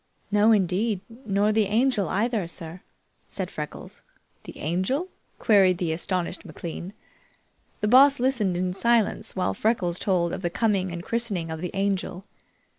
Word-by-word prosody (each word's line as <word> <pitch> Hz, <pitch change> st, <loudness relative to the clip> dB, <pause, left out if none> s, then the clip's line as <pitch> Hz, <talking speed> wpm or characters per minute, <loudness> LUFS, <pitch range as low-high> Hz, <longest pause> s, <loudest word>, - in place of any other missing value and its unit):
"No, 210 Hz, +2 st, +5 dB
indeed; 195 Hz, 0 st, +1 dB, 0.3 s
nor 205 Hz, +1 st, +2 dB
the 215 Hz, 0 st, +2 dB
Angel, 215 Hz, -2 st, +1 dB
either, 215 Hz, -2 st, 0 dB
sir," 165 Hz, +1 st, -8 dB, 0.5 s
said -, -, -5 dB
Freckles. -, -, -8 dB, 0.4 s
"The -, -, -10 dB
Angel?" 190 Hz, -, -1 dB, 0.3 s
queried 195 Hz, -5 st, +4 dB
the 170 Hz, -2 st, -1 dB
astonished 180 Hz, +1 st, -2 dB
McLean. 175 Hz, +3 st, -7 dB, 0.9 s
The 210 Hz, -, +1 dB
Boss 270 Hz, +4 st, +6 dB
listened 235 Hz, -8 st, +1 dB
in 180 Hz, 0 st, -1 dB
silence 230 Hz, +2 st, +1 dB
while 180 Hz, -, 0 dB
Freckles 180 Hz, -, 0 dB
told 175 Hz, -3 st, +1 dB
of -, -, -4 dB
the 175 Hz, -, -1 dB
coming 195 Hz, -1 st, 0 dB
and 170 Hz, 0 st, -6 dB
christening 205 Hz, -9 st, -2 dB
of 160 Hz, 0 st, -5 dB
the 180 Hz, -, -3 dB
Angel. 195 Hz, -1 st, -2 dB
195 Hz, 145 wpm, -25 LUFS, 180-220 Hz, 0.9 s, Boss